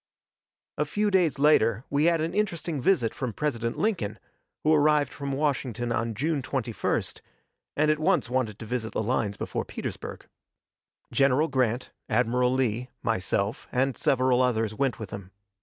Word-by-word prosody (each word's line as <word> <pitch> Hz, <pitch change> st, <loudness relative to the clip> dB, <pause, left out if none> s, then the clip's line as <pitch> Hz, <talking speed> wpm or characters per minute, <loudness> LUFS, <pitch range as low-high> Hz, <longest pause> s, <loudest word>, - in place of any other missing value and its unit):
A 150 Hz, -, +2 dB
few 205 Hz, +7 st, 0 dB
days 180 Hz, -7 st, +3 dB
later 115 Hz, -6 st, +4 dB
we 145 Hz, +2 st, +2 dB
had 170 Hz, -1 st, +3 dB
an 160 Hz, -, -2 dB
interesting 170 Hz, -8 st, -1 dB
visit 135 Hz, -, +2 dB
from 125 Hz, -4 st, -4 dB
President 115 Hz, -5 st, -2 dB
Lincoln, 115 Hz, -, -1 dB, 0.5 s
who 155 Hz, -, +4 dB
arrived 150 Hz, -2 st, +3 dB
from 140 Hz, -1 st, -4 dB
Washington 130 Hz, -4 st, -1 dB
on 115 Hz, -1 st, -1 dB
June 150 Hz, +5 st, 0 dB
21st, 125 Hz, -4 st, -2 dB, 0.6 s
and 155 Hz, +1 st, +4 dB
at 155 Hz, -, 0 dB
once 180 Hz, -3 st, +2 dB
wanted 120 Hz, -4 st, -1 dB
to 110 Hz, -, -8 dB
visit 110 Hz, -1 st, -3 dB
the -, -, -1 dB
lines 105 Hz, -3 st, 0 dB
before -, -, -3 dB
Petersburg. -, -, -6 dB, 0.9 s
General 140 Hz, +3 st, +3 dB
Grant, 125 Hz, -2 st, 0 dB, 0.2 s
Admiral 125 Hz, +1 st, +2 dB
Lee, 125 Hz, -1 st, 0 dB
myself, 100 Hz, -1 st, -1 dB
and 130 Hz, 0 st, +1 dB
several 130 Hz, -1 st, +2 dB
others 115 Hz, -4 st, +1 dB
went 135 Hz, +2 st, 0 dB
with 110 Hz, -4 st, -7 dB
him. 100 Hz, -2 st, -7 dB
130 Hz, 155 wpm, -27 LUFS, 115-150 Hz, 0.9 s, later